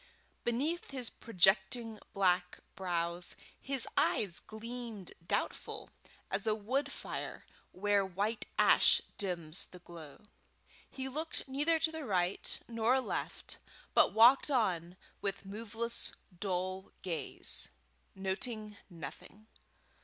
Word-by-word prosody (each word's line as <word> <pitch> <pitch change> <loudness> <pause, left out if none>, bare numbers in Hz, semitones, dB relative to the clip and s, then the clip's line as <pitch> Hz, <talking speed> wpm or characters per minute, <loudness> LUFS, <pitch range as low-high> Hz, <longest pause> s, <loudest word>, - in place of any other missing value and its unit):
Beneath 290 +9 0
his 255 -4 -4
projecting 215 +2 +3
black 180 -2 +2 0.2
brows, 175 -1 -1 0.2
his 270 -3 0
eyes 190 -5 +2
gleamed 230 -3 -7
doubtful, - - -2 0.4
as 195 +3 +3
a 215 - +4
wood 250 +7 -1
fire - - -5 0.3
where 205 +1 +2
white 200 +4 -1
ash - - +7 0.2
dims 175 -4 -1
the 180 - -12
glow. 170 -2 -11 0.7
He 265 0 -5
looked 310 +4 -1
neither 295 +5 +2
to 320 0 +1
right 185 -6 0
nor 235 +3 +3
left, 260 - -4 0.3
but - - +6
walked 240 +6 +7
on 185 - +1 0.2
with 200 0 -2
moveless 225 +3 -3 0.3
dull 185 0 -2
gaze, 165 -7 -3 0.5
noting 210 +2 -2
nothing. 170 +5 -9
205 Hz, 105 wpm, -34 LUFS, 185-235 Hz, 0.7 s, ash